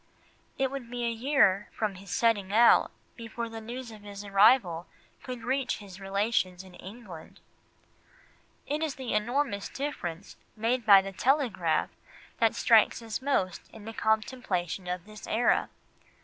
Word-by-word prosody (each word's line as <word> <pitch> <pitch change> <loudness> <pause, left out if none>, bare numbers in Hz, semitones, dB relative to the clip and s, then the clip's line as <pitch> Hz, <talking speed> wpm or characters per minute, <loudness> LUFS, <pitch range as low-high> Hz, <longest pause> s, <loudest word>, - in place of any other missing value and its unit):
It 265 -1 0
would 270 -4 -6
be 245 0 -4
a 235 - 0
year 225 -5 +2
from 215 -2 -2
his 195 +1 -13
setting 205 -2 +1
out 230 +3 +6 0.3
before 230 0 -6
the 225 0 -8
news 240 +2 -7
of 215 -1 -12
his 205 0 -9
arrival 195 -4 +4 0.3
could 255 -3 -7
reach 265 +1 -1
his 195 -2 -12
relations 195 -2 -1
in 185 -1 -15
England. 190 -3 -11 1.3
It 295 +2 -2
is 315 -4 -2
the 260 -3 -4
enormous 210 -1 -1
difference 200 - -5 0.2
made 230 +2 -1
by 195 -2 +8
the 195 - -6
telegraph 230 - +1 0.5
that - - +3
strikes - - +4
us 225 0 -4
most 260 -10 -1
in 215 -2 -12
the 225 - -6
contemplation 215 -6 -1
of 180 -1 -4
this 215 0 -11
era. 230 +3 +2
220 Hz, 150 wpm, -28 LUFS, 195-245 Hz, 1.3 s, by